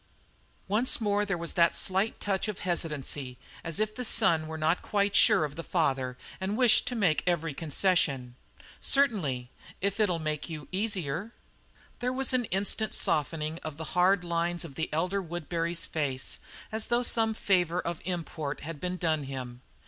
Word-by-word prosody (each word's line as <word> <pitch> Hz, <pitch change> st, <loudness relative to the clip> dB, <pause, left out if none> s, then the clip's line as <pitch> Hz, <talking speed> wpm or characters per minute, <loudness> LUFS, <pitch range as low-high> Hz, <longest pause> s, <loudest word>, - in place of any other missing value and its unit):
Once 215 Hz, +6 st, +3 dB
more 205 Hz, -2 st, +1 dB
there 195 Hz, -3 st, -1 dB
was 170 Hz, 0 st, -1 dB
that 170 Hz, -1 st, +4 dB
slight 195 Hz, +3 st, +1 dB
touch 195 Hz, 0 st, -1 dB
of 210 Hz, -3 st, -3 dB
hesitancy, 150 Hz, -7 st, -2 dB, 0.3 s
as 165 Hz, +3 st, -3 dB
if 215 Hz, 0 st, 0 dB
the 250 Hz, -, -4 dB
son 160 Hz, -8 st, +4 dB
were 160 Hz, 0 st, -5 dB
not 160 Hz, +3 st, +1 dB
quite 200 Hz, -1 st, 0 dB
sure 210 Hz, -8 st, +6 dB
of 145 Hz, -1 st, -7 dB
the 165 Hz, -, -4 dB
father 135 Hz, -8 st, 0 dB, 0.2 s
and 195 Hz, +3 st, -2 dB
wished 250 Hz, -3 st, +5 dB
to 250 Hz, -, -2 dB
make 180 Hz, -9 st, +2 dB
every 165 Hz, -3 st, 0 dB
concession. 145 Hz, -5 st, +1 dB, 0.5 s
"Certainly, 160 Hz, -, +2 dB, 0.3 s
if 200 Hz, +2 st, -1 dB
it'll 195 Hz, -5 st, +3 dB
make 155 Hz, 0 st, -3 dB
you 155 Hz, -2 st, -7 dB
easier." 195 Hz, -1 st, -2 dB, 0.7 s
There 250 Hz, +1 st, 0 dB
was 265 Hz, +1 st, +1 dB
an 250 Hz, -2 st, +2 dB
instant 205 Hz, +3 st, 0 dB
softening 155 Hz, +2 st, 0 dB
of 155 Hz, -2 st, -6 dB
the 160 Hz, -, -5 dB
hard 180 Hz, +1 st, +4 dB
lines 170 Hz, 0 st, -1 dB
of 150 Hz, -, -9 dB
the 160 Hz, +4 st, -3 dB
elder 180 Hz, +6 st, 0 dB
Woodbury's 170 Hz, 0 st, -2 dB
face, 135 Hz, -4 st, -1 dB, 0.3 s
as 220 Hz, 0 st, -2 dB
though 240 Hz, +1 st, +2 dB
some 225 Hz, -2 st, +1 dB
favour 180 Hz, -4 st, +1 dB
of 170 Hz, -2 st, -3 dB
import 165 Hz, -5 st, -4 dB
had 155 Hz, -1 st, -6 dB
been 180 Hz, +2 st, -3 dB
done 160 Hz, -4 st, 0 dB
him. 125 Hz, -2 st, -6 dB
175 Hz, 170 wpm, -29 LUFS, 155-200 Hz, 0.7 s, sure